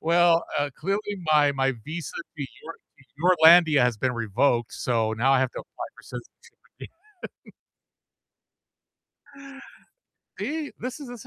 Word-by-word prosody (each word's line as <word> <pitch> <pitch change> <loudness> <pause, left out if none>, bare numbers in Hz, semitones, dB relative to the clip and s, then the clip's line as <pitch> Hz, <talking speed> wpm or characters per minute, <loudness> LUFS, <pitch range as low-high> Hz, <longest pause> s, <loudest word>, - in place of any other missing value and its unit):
Well, 170 0 +3
uh, 145 0 -1
clearly 205 +1 -2 0.2
my 145 -1 +4
my 135 0 0
visa 160 0 -6 0.2
to 140 -3 -4 0.2
Your 165 +1 -8 0.2
to 145 +8 0
Yourlandia 160 -5 +7
has 120 -3 +1
been 130 +3 -1
revoked, 115 +1 0
so 115 -3 -1
now 125 +5 +2
I 135 - +4
have 130 - 0
to - - -6
apply - - -9
for - - -15
citizenship - - -11 1.1
again. - - -15 2.9
See? 305 0 -4
This 255 +4 -6
is 245 -6 -10
145 Hz, 135 wpm, -25 LUFS, 130-175 Hz, 2.9 s, Yourlandia